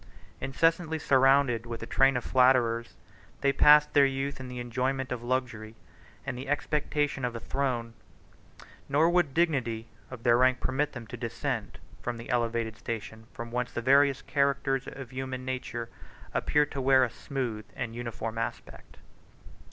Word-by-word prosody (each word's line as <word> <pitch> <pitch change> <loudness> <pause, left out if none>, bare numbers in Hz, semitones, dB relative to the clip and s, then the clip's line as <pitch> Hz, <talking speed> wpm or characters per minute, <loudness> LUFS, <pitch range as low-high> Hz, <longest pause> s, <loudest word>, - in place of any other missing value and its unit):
Incessantly 160 +3 +1
surrounded 135 -4 +3
with 115 -1 -6
a - - -4
train 135 -1 +3
of 120 - -3
flatterers, 125 -3 +3 0.5
they 140 0 +3
passed 150 +1 +6
their 140 -1 +6
youth 135 +1 -3
in 130 - -7
the 125 0 -7
enjoyment 130 +2 -2
of 125 -2 -3
luxury, 120 -3 -3 0.5
and 135 - -3
the 130 +2 -7
expectation 145 -1 -1
of 120 -1 -2
a - - -4
throne; 120 -3 -2 1.0
nor 150 +4 +4
would 175 -2 +3
the 135 - -17
dignity 130 -9 0 0.2
of 125 -3 -9
their 120 0 +4
rank 130 0 +4
permit 145 +3 -1
them 120 -4 -7
to 120 +2 -8
descend 115 -2 -4 0.2
from 120 -1 -3
that 115 - -7
elevated 115 -2 0
station 110 -1 -6
from 115 0 -8
whence 125 0 -2
the - - -3
various 135 +2 +4
characters 140 -1 0
of 135 -3 -8
human 130 0 -5
nature 125 -2 -4 0.5
appear 150 0 +2
to 140 -1 -5
wear 130 0 +5
a 120 - 0
smooth 120 -7 -4
and 120 -3 -4
uniform 115 -1 -4
aspect. 115 - -6
130 Hz, 160 wpm, -28 LUFS, 115-140 Hz, 1.0 s, passed